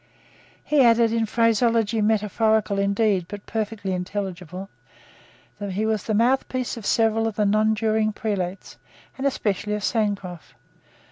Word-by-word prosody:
He 300 -2 +3
added, 230 -1 +4
in 225 -1 +1
phraseology 230 -1 +2
metaphorical 215 -1 +1
indeed, 200 -2 +1
but 205 -1 -8
perfectly 210 -3 -3
intelligible, 185 -1 -5 0.9
that 200 -2 -4
he 210 +3 -1
was 220 -3 -1
the 215 - 0
mouthpiece 255 +2 +1
of 225 -4 -6
several 225 0 +2
of 220 - -4
the 210 - +1
nonjuring 215 +1 +2
prelates, 195 -4 -4 0.4
and 275 - +1
especially 210 -4 -1
of 210 - -5
Sancroft. 200 -7 -2
215 Hz, 130 wpm, -23 LUFS, 200-225 Hz, 0.9 s, added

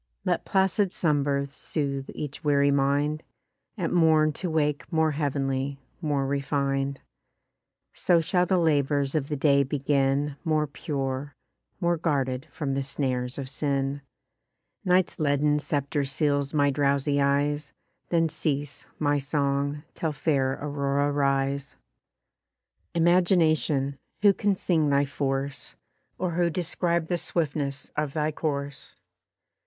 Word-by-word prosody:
Let - - 0
placid 190 0 +2
slumbers 140 -4 0
sooth 140 -2 -3
each 145 -2 -6
weary 140 -1 +3
mind, 140 +2 +1 0.6
At 180 -4 -1
morn 160 -3 +4
to 180 +4 -3
wake 150 -2 0
more 160 -1 +2
heav'nly, 140 -2 -1 0.2
more 145 -4 0
refin'd; 140 0 -1 0.9
So 175 -2 +3
shall 180 +2 +1
the 185 - +3
labours 145 -4 +2
of 150 -3 0
the 150 - -1
day 140 0 +4
begin 140 +1 0
More 155 -1 +1
pure, 140 -1 -4 0.4
more 170 -2 +1
guarded 135 -5 -1
from 145 -4 -3
the 135 - 0
snares 130 -2 -2
of 135 -2 -4
sin. 140 0 -1 0.8
Night's 180 -1 +2
leaden 150 0 +2
sceptre 145 0 -1
seals 140 0 0
my 145 -2 +3
drowsy 140 0 +1
eyes, 145 +1 +1 0.4
Then 165 -1 +3
cease, 145 -2 -3
my 145 -1 +1
song, 140 0 -1
till 160 -2 -2
fair 135 -3 +1
Aurora 140 0 0
rise. 140 0 0 1.2
Imagination! 165 -5 +3 0.2
Who 200 -1 +7
can 200 +1 +1
sing 160 -5 +1
thy 140 0 +3
force? 135 0 -3 0.4
Or 180 -2 -1
who 170 +1 +1
describe 170 0 -1
the 175 +1 -1
swiftness 145 -5 -2
of 150 -2 -1
thy 155 -1 0
course? 145 -2 -4
145 Hz, 125 wpm, -26 LUFS, 140-155 Hz, 1.2 s, Who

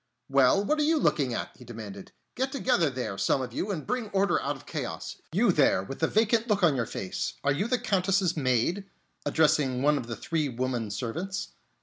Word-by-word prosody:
"Well, 135 +9 +4
what 305 +7 +1
are - - +3
you 320 +2 +3
looking 140 - +2
at?" - - -4
he 125 - -14
demanded. 110 -4 -9 0.2
"Get 265 +1 -1
together 250 - +2
there, 125 -7 -4
some 95 +7 +2
of 125 -2 -5
you, 195 - -2
and 175 -7 -3
bring 245 -4 -2
order 200 0 +2
out 145 +1 -2
of 135 - -14
chaos. - - -5
You - - +3
there, 95 - +3
with 135 +8 -7
the 160 - +2
vacant 225 +3 +2
look 205 -3 +1
on 160 -5 +5
your 115 -4 -1
face, 95 - -4
are 140 - +3
you 195 +10 -1
the 250 +1 +2
Countess's 190 -4 +1
maid?" 140 - +1 0.4
addressing 140 -5 +2
one 150 0 +4
of 115 - -7
the 115 - -4
three 155 +5 -1
woman 125 -2 -2
servants. 165 - -4
150 Hz, 210 wpm, -28 LUFS, 125-200 Hz, 0.4 s, on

